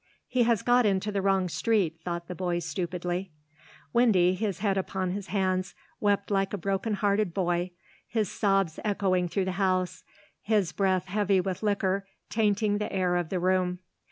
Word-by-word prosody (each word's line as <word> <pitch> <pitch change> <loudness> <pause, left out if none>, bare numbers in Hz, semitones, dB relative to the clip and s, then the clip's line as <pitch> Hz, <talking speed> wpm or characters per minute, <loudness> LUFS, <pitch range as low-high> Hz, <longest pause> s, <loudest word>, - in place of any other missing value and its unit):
"He 250 -1 +1
has 235 -3 +2
got 245 0 +4
into 200 +1 0
the 200 -1 -1
wrong 190 -1 +2
street," 180 -4 0
thought 170 0 -4
the 180 - -5
boy 180 -1 -1
stupidly. 175 +1 -3 0.6
Windy, 190 -7 +4
his 200 -2 -2
head 195 0 0
upon 190 -1 -2
his 200 +1 -4
hands, 185 -1 -1 0.2
wept 205 0 +1
like 195 0 +1
a - - 0
brokenhearted 200 0 0
boy, 175 -1 0 0.4
his 220 -3 0
sobs 195 -6 +1
echoing 190 -4 +1
through 190 +2 -1
the 190 - -1
house, 185 -1 0 0.4
his 205 -5 +1
breath 185 -1 +1
heavy 200 0 +2
with 185 -1 -2
liquor 200 -2 0 0.2
tainting 205 -1 +2
the 210 - -3
air 185 -2 +1
of 175 -2 -1
the 185 - -1
room. 180 0 +1
190 Hz, 165 wpm, -28 LUFS, 180-205 Hz, 0.6 s, got